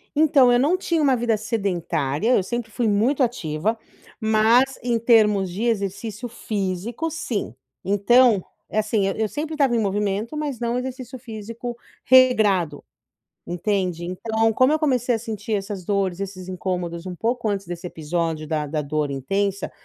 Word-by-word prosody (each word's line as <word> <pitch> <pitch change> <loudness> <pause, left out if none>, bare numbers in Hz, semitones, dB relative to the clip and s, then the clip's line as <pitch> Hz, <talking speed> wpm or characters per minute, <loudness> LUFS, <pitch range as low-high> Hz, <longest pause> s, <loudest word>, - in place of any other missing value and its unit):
Então 290 -5 +5
eu 245 - +4
não 310 +8 +3
tinha 335 -3 0
uma 275 -3 +4
vida 235 -2 +1
sedentária, 200 - 0
eu 195 - +2
sempre 230 +3 -4
fui 235 +2 0
muito 225 +8 +2
ativa, 215 -2 -1 0.4
mas 225 +4 +3
em 235 -1 +1
termos 210 -5 +4
de 195 +6 -4
exercício 210 +1 -2
físico, 215 - -3
sim, 235 - -3 0.3
então, 205 +1 +4 0.3
é 215 - 0
assim, 215 -2 +1
eu 195 - 0
eu 220 0 0
sempre 305 +5 -4
estava 275 -5 +2
em - - +2
movimento, 205 +4 -1
mas 290 -5 -3
não 240 0 -1
exercício 255 0 -5
físico 230 0 -7 0.3
regrado, 210 - +4 0.6
entende. 180 -1 -1
Então 220 +5 0
como 255 +6 +4
eu 310 - +1
comecei 255 -5 +1
a 225 - -3
sentir 220 -1 -5
essas 195 -3 -3
dores, 195 -3 0
esses 190 -2 -6
incômodos 180 -2 -3
um 185 -1 -5
pouco 235 +4 -1
antes 200 -1 -2
desse 175 +1 -5
episódio 160 -1 -3
da 155 -1 -1
da 150 +1 -2
dor 150 0 -2
intensa, 195 +8 -2
215 Hz, 160 wpm, -23 LUFS, 185-240 Hz, 0.6 s, Então